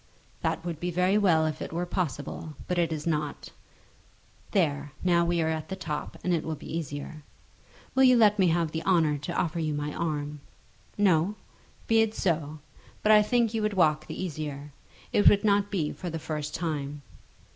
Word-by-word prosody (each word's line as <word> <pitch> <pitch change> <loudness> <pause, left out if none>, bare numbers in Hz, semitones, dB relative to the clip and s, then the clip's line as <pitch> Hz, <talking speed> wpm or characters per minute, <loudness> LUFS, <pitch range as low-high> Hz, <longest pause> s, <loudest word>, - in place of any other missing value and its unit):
"That - - -1
would 170 -3 -4
be 175 - -2
very 180 +3 +2
well 165 -6 +4
if 155 -1 -3
it - - -5
were 170 +2 -2
possible; 160 -3 -4
but 180 -1 0
it 165 -1 +1
is 155 -1 -4
not. 150 -3 -2 1.0
There; 145 -7 0
now 175 -1 +4
we 170 -1 +1
are - - 0
at 160 -1 -3
the 190 - -3
top, 155 -5 -5
and 180 - +1
it 165 - 0
will 160 - -3
be 155 - -7
easier. 155 0 -5 0.7
Will 265 - +3
you 255 -1 +6
let 210 -2 +5
me 185 - +5
have 165 -1 +1
the 160 - -3
honour 165 -5 +2
to 145 - -3
offer 170 -2 -1
you 155 -2 -1
my 145 0 -3
arm? 150 -3 -3 0.6
No! 190 -1 +3 0.5
Be 225 0 +4
it 220 0 0
so; 155 -4 -1 0.5
but 215 - +5
I 210 -1 +8
think 230 +1 +1
you 225 - 0
would 210 -1 0
walk 155 -4 +2
the - - -6
easier. 150 -4 -5 0.4
It 205 - +7
would 205 - +2
not 205 -1 +3
be 170 -8 -1
for 180 - -6
the 165 - -4
first 150 -1 -4
time." 150 -4 -3
165 Hz, 195 wpm, -28 LUFS, 150-190 Hz, 1.0 s, I